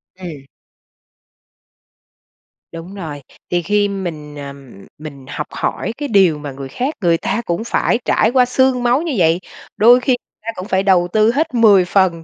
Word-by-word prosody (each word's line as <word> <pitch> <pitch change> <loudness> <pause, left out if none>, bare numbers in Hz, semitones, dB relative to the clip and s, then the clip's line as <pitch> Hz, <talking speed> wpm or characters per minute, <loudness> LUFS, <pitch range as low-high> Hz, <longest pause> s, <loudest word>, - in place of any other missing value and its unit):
Ừm. 170 -7 -9 2.3
Đúng 170 +3 -9
rồi. 155 -7 -7 0.3
Thì 175 0 0
khi 205 +4 +1
mình, 165 -7 -6
ờ, 140 -1 -7 0.4
mình 145 -3 -10
học 150 - -5
hỏi 225 - -3
cái 290 - -3
điều 190 - +3
mà 145 -1 -6
người 135 0 -8
khác, 265 - -3
người 170 -3 +3
ta 230 - -2
cũng 170 +5 -2
phải 235 0 0
trải 220 - +2
qua 255 -1 +4
xương 255 0 +1
máu 245 +4 +2
như 330 -3 -3
vậy. 165 -1 +3 0.4
Đôi 240 +3 +6
khi 255 0 +1 0.3
ta 225 - -6
cũng 185 +2 -7
phải 190 -1 +1
đầu 185 -3 +3
tư 215 +1 +4
hết 290 +3 -1
10 210 -6 +5
phần, 180 -3 +1
190 Hz, 170 wpm, -17 LUFS, 165-235 Hz, 2.3 s, Đôi